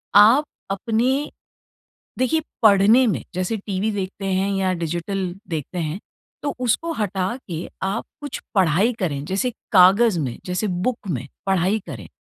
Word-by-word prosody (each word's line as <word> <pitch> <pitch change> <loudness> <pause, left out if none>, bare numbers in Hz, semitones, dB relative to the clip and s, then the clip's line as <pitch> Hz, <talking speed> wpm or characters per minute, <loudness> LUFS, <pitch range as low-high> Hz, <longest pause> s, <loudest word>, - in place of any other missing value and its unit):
आप 220 +8 +8 0.3
अपने 240 +7 0 0.9
देखिए 315 +5 +2 0.2
पढ़ने 215 +4 +6
में 210 - -1
जैसे 185 +5 -1
टीवी 200 +1 -2
देखते 195 -1 -4
हैं 195 +1 +1
या 190 -1 +1
डिजिटल 175 +2 -3 0.2
देखते 160 +2 -4
हैं 160 +3 -3 0.4
तो 285 -1 -1
उसको 255 +7 0
हटा 200 - -1
के 165 +1 -4 0.2
आप 195 +4 -1 0.2
कुछ 290 - -5 0.2
पढ़ाई 190 +4 +3
करें, 145 -7 -1
जैसे 195 +9 0 0.2
कागज 195 +2 +6
में, 130 -7 -2
जैसे 180 +4 -1
बुक 195 +4 -2
में 135 -3 -3 0.2
पढ़ाई 190 +2 +2
करें 110 - -7
195 Hz, 140 wpm, -22 LUFS, 180-220 Hz, 0.9 s, आप